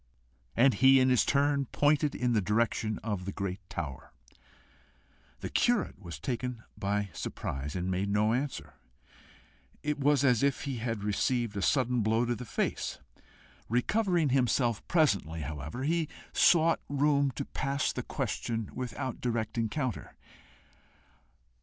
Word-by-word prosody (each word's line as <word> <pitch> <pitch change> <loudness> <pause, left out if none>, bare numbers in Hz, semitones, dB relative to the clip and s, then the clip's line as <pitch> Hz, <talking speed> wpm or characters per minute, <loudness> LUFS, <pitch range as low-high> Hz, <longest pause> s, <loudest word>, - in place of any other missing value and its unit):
And 130 +2 +6
he 135 +1 +6
in 130 0 +4
his 125 -2 +4
turn 140 -1 +2
pointed 145 +1 +2
in 125 -1 0
the 110 - +3
direction 110 +1 0
of 105 -4 -3
the 100 - -3
great 95 -1 -4
tower. 75 -6 -6 1.3
The - - -4
curate 235 - +1
was 85 -6 -7
taken 120 - -3
by 100 0 -1
surprise 70 0 -4
and 90 +1 -1
made 95 +2 -1
no 105 +2 +2
answer: 135 +3 -3 1.1
it 150 -1 -1
was 145 -1 +3
as 125 -5 +4
if 140 -1 +1
he 135 -3 -3
had 115 -2 -3
received 110 +2 0
a 100 - -2
sudden 125 0 +2
blow 110 +2 +2
in 120 0 0
the 125 - -7
face. - - -2 0.7
Recovering 175 - +2
himself 120 -3 +2
presently, 100 - +2
however, 75 - -5
he 160 +2 +1 0.3
sought 165 -1 +5
room 140 0 +2
to - - -3
pass 140 0 -1
the - - -3
question 115 -2 -3
without 125 0 -4
direct 115 -3 -2
encounter. 120 +1 -2
120 Hz, 140 wpm, -30 LUFS, 105-140 Hz, 1.3 s, And